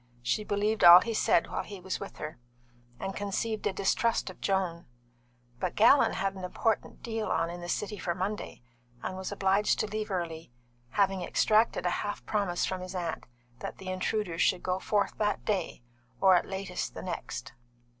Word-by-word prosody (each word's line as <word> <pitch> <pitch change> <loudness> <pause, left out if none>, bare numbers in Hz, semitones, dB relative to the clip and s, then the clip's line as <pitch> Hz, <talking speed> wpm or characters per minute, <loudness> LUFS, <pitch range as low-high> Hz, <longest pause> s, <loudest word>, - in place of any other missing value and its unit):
She 210 - 0
believed 210 +1 0
all 175 +1 +11
he 230 - -2
said 175 - +3
while - - -1
he 200 -2 -9
was 185 +1 -4
with 200 - -8
her, 155 -4 -6 0.6
and 195 - -4
conceived 210 +2 -2
a - - +1
distrust 200 +2 +1
of - - -18
Joan; 185 -4 -1 0.7
but - - -2
Gallon 265 +6 +6
had 195 0 -1
an 190 -1 -9
important 220 +4 -1
deal 225 -2 -2
on 165 - 0
in 175 0 -7
the 175 - -6
City 210 +1 -2
for 170 -1 -2
Monday, 190 - -4 0.4
and 185 - -3
was 190 +1 -5
obliged 200 +1 +2
to - - +1
leave 215 0 -4
early, 165 -6 -4 0.4
having 195 - +1
extracted 215 -1 +2
a 180 - +2
half 205 0 -4
promise 200 -5 0
from 185 -1 -3
his 185 +1 -7
aunt 175 -2 -3 0.3
that - - -6
the 190 - -7
intruder 185 -1 -2
should 180 - +2
go 185 0 0
forth 205 +1 0
that 210 -1 0
day, 190 - -2 0.4
or 190 -1 +6
at 175 - +2
latest 190 -1 -4
the - - -6
next. 140 -7 -5
190 Hz, 185 wpm, -29 LUFS, 180-210 Hz, 0.7 s, all